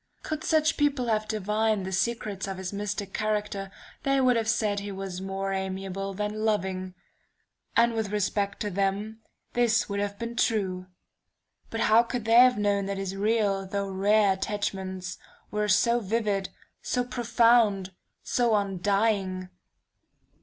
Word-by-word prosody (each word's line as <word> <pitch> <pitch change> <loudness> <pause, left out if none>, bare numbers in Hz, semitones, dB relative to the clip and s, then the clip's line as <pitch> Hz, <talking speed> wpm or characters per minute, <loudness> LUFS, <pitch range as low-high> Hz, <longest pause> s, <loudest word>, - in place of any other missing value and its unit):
"Could 310 0 -4
such 315 0 +2
people 285 -4 +1
have 215 -1 +1
divined 215 -1 0
the 190 - -4
secrets 200 -1 -1
of 195 -1 -4
his 190 +1 -5
mystic 200 -1 -4
character, 210 -2 -2 0.3
they 275 0 +2
would 255 -2 +4
have 225 -1 0
said 210 -3 +1
he 200 0 -6
was 190 -1 -5
more 195 0 -3
amiable 190 0 -4
than 210 +2 -3
loving 190 -3 -1 0.8
and 235 0 +5
with 220 -2 -1
respect 205 0 -1
to 210 -2 -2
them, 200 +3 -1 0.3
this 235 -2 +2
would 200 -1 -2
have 200 0 -2
been 235 +1 -5
true. 190 -6 0 0.8
But 225 - -3
how 225 +1 +6
could 240 -1 -4
they 225 - -1
have 250 -1 +6
known 200 -1 +1
that 200 0 -3
his 195 0 -3
real, 200 -2 +1
though 200 0 -2
rare 200 +1 +3
attachments, 190 -2 -4 0.3
were 210 0 0
so 235 +4 +3
vivid, 205 -3 -1 0.3
so 250 - 0
profound, 230 -5 +3 0.3
so 240 -3 +2
undying?... 195 -1 0
205 Hz, 145 wpm, -27 LUFS, 195-225 Hz, 0.8 s, how